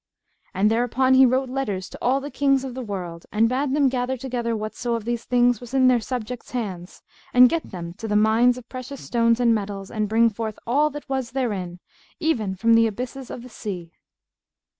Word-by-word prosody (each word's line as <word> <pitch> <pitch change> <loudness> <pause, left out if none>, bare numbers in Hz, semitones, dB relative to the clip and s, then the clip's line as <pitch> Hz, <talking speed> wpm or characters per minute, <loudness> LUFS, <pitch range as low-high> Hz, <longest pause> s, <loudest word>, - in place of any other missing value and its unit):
And 205 +3 +3
thereupon 245 +3 +2
he 260 0 +7
wrote 260 +2 +1
letters 220 -8 -3
to - - -11
all 260 +3 +2
the 285 +1 -7
Kings 275 -2 +2
of 265 -2 -5
the 260 - -5
world 180 -7 -6
and 220 +2 +3
bade 265 +3 0
them 290 -2 +4
gather 255 0 -1
together 240 -2 -2
whatso 215 +3 -3
of 225 -2 -5
these 235 0 -2
things 245 -2 +2
was 245 +2 -7
in 260 -1 +5
their 250 -1 +4
subjects' 245 0 -5
hands, 190 -7 -5 0.3
and 250 0 +9
get 330 +4 -2
them 170 -2 -7
to 225 - -5
the 210 - 0
mines 225 +4 +4
of 245 -2 -11
precious 255 +1 -8
stones 230 -1 +2
and 235 -2 +4
metals, 200 -2 -4
and 215 -2 -1
bring 230 +1 +4
forth 220 0 -5
all 290 +6 +2
that 295 0 -9
was 265 -3 -3
therein, 195 -9 -2 0.4
even 230 - 0
from 230 +5 +3
the 230 0 +5
abysses 250 +4 -6
of 235 - -7
the 250 - -11
seas. 180 -7 -6
240 Hz, 205 wpm, -23 LUFS, 215-260 Hz, 0.4 s, and